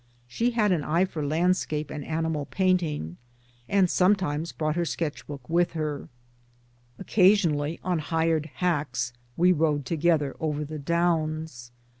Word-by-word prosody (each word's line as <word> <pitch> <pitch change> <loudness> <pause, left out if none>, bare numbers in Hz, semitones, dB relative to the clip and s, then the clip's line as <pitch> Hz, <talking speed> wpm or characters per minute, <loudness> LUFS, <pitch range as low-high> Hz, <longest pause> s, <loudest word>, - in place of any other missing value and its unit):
She 230 - 0
had 220 -4 +2
an 165 -5 +1
eye 170 +6 +2
for 165 -5 -5
landscape 155 -1 0
and 150 -2 -5
animal 160 -2 -2
painting, 170 - 0 0.5
and 195 -2 +4
some 185 +3 +4
times 165 -3 -3
brought 155 -1 -2
her 175 - +1
sketch 160 -1 -3
book 140 -4 -8
with 175 +1 +1
her. 150 -3 -3 0.9
'Occasion 195 -2 +4
ally 145 +2 -2
on 180 -2 0
hired 160 0 0
hacks 140 -9 -1 0.2
we 180 +2 +5
rode 150 -4 +1
together 160 -2 +1
over 150 -1 -2
the 155 +1 -6
Downs. 155 -5 -1
160 Hz, 145 wpm, -26 LUFS, 150-175 Hz, 0.9 s, we